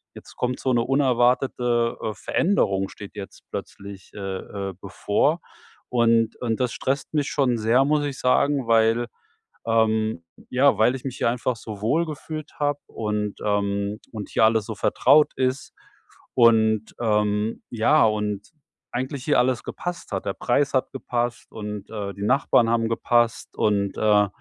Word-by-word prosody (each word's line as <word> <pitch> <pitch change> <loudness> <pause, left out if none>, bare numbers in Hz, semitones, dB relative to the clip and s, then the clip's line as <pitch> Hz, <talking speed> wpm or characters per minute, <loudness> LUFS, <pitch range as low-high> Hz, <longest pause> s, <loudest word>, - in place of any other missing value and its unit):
jetzt - - -13
kommt 125 0 -2
so 130 - 0
'ne 120 - +3
unerwartete, 125 -2 +2
äh 110 -1 -2
Veränderung 95 - +1
steht 100 0 -11
jetzt 100 -2 -9
plötzlich, 100 -1 -8
äh, - - -7 0.5
äh, - - -7
bevor 105 - 0 0.5
und 115 -2 +2
und 115 -2 -1
das 125 -2 0
stresst 135 +3 -2
mich 150 -2 0
schon 130 -6 +1
sehr, 120 +5 +3
muss 150 0 +2
ich 140 -2 -5
sagen, 135 0 +2
weil, 115 +1 +3 0.6
ähm 110 -4 +1 0.3
ja, 135 +3 +3
weil 120 +4 +3
ich 130 - -8
mich 135 -2 -5
hier - - +1
einfach 125 +1 -1
so 105 -3 -8
wohlgefühlt 155 +4 -2
habe 145 -1 0
und, 105 -2 -3
ähm 100 0 -1
und 105 -3 -7
hier 110 - +3
alles 110 -1 +2
so 110 -1 -5
vertraut 150 +8 +4
ist 130 +1 -2 0.6
und, 110 -2 +3
ähm 105 -1 0
ja, 120 +5 +4
und 105 -2 -1 0.4
eigentlich 130 +2 -4
hier 150 - +3
alles 125 -1 +1
gepasst 175 -8 -6
hat. 95 0 -3
Der 100 - -1
Preis 140 +3 0
hat 130 0 0
gepasst 120 -2 -3
und, 105 -2 -7
äh, 100 -3 -5
die 100 - -7
Nachbarn 120 -1 +3
haben 115 -1 +1
gepasst 120 0 0
und, 100 -2 +1
äh 105 -1 +4
115 Hz, 155 wpm, -24 LUFS, 105-130 Hz, 0.6 s, vertraut